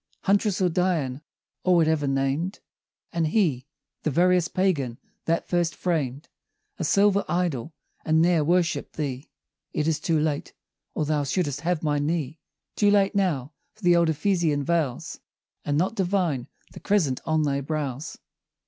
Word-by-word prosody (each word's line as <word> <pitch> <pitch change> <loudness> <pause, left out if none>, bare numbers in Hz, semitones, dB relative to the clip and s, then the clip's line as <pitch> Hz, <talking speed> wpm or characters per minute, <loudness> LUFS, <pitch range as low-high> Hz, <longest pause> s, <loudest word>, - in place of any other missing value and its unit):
Huntress, 200 0 +2
or 180 - +3
Dian, 160 -7 0 0.4
or 185 -1 +4
whatever 160 -3 +2
named; 135 +7 -1 0.5
And 165 -2 +1
he, 155 - +1 0.3
the - - 0
veriest 180 +3 +2
Pagan, 150 -11 +1 0.3
that 165 0 0
first 175 -1 0
framed 150 -5 -2 0.5
A - - -1
silver 200 0 +3
idol, 165 -4 -1 0.3
and 160 0 +2
ne'er 170 -1 +4
worshipp'd 175 +2 0
thee! 140 -2 -4 0.4
It 150 - 0
is 160 -2 +1
too 165 -2 +1
late 150 -1 -2 0.4
or 155 - 0
thou 150 -1 0
should'st 145 -1 -1
have 170 0 -1
my 145 -1 +1
knee 155 0 -2 0.4
Too 205 - +3
late 200 -1 +3
now 160 -9 0 0.2
for 215 - -22
the 175 -1 +5
old 170 -1 +3
Ephesian 160 -3 +1
vows, 160 -6 -1 0.4
And 145 0 0
not 185 +7 +1
divine 180 - 0 0.2
the - - -10
crescent 175 -11 +1
on 160 -1 +2
thy 140 -1 0
brows! 145 0 -4
160 Hz, 150 wpm, -25 LUFS, 145-180 Hz, 0.5 s, the